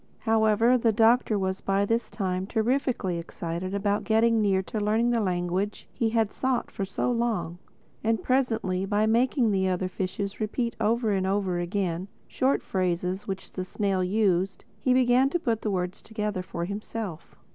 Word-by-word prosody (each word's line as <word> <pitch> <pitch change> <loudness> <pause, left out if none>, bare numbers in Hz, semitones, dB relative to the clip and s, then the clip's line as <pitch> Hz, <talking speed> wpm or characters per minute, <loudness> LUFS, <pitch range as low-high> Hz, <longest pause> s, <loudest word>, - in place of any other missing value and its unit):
However 225 +2 +3
the 230 -1 +3
Doctor 225 0 +3
was 190 -1 -2
by 195 +1 +1
this 230 +3 0
time 190 -2 -2
terrifically 225 -5 0
excited 170 +3 -4
about 200 +1 0
getting 225 0 +3
near 195 -2 +2
to 215 - -4
learning 220 +3 +2
the 235 - +2
language 185 +1 -1
he 230 - 0
had 225 -2 +1
sought 260 -2 -1 0.2
so 195 +6 -1
long. 220 -8 -1 0.4
And 220 -3 +1
presently 225 -8 +1
by 210 +2 +2
making 235 +1 +2
the 190 -1 +1
other 185 0 0
fishes 195 +2 -4
repeat 235 +2 -2
over 225 +1 +2
and 190 -1 +1
over 190 -2 0
again 175 0 -2 0.2
short 265 +2 +1
phrases 185 +1 -1
which 190 -1 -5
the 185 - -4
snail 190 0 -1
used, 190 -1 +1
he 255 - +1
began 255 +1 +4
to 350 - 0
put 230 -8 -1
words 185 -2 -2
together 210 -3 -3
for 170 -1 -4
himself. 200 -3 -6
205 Hz, 160 wpm, -27 LUFS, 185-230 Hz, 0.4 s, began